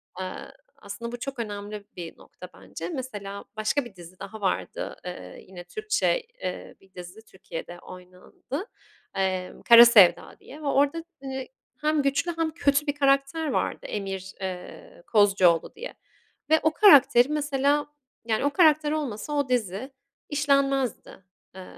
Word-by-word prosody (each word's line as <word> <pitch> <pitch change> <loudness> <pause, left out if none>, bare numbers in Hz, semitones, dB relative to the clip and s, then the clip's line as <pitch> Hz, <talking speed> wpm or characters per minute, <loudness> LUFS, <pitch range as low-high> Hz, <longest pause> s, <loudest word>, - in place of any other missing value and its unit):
Aaa, 185 0 -6 0.3
aslında 205 +4 -8
bu 245 - -7
çok 270 0 -6
önemli 205 -1 -6
bir 170 -2 -8
nokta, - - -13
bence. - - -8
Mesela, 210 - -6
başka 240 +5 0
bir 210 -5 -13
dizi 175 +1 -14
daha 210 +2 -9
vardı. 190 - -2
Iıı, 90 - -8
yine 180 -2 -12
Türkçe, 430 - -1 0.2
eee, - - -5
1 190 -1 -24
dizi 180 +4 -10
Türkiye'de 175 -2 -9
oynandı. 185 - -9 0.5
Eee, 185 -1 -1 0.2
"Kara 235 0 +11
Sevda" 185 -7 +5
diye 300 +3 -13
ve 290 - -4
orada, 285 +4 +1 0.2
hani, 265 -1 -5 0.3
hem 305 0 +2
güçlü 285 +5 -1
hem 325 -1 0
kötü 290 -2 +1
bir 285 - 0
karakter 275 +3 +1
vardı, - - -2
Emir, 195 -2 -5
eee, 195 - -8
Kozcuoğlu 195 -6 +3
diye. 470 +3 -8 0.6
Ve 315 - +5
o 315 0 +2
karakteri, 280 - +6
mesela, 290 -1 0 0.4
yani, 225 +4 0
o - - +3
karakter 305 -2 +4
olmasa 295 -3 -3
o 285 -3 0
dizi 235 +1 -2 0.4
işlenmezdi. 275 -8 0 0.3
Eee, 190 - -9
245 Hz, 145 wpm, -26 LUFS, 195-290 Hz, 0.6 s, Kara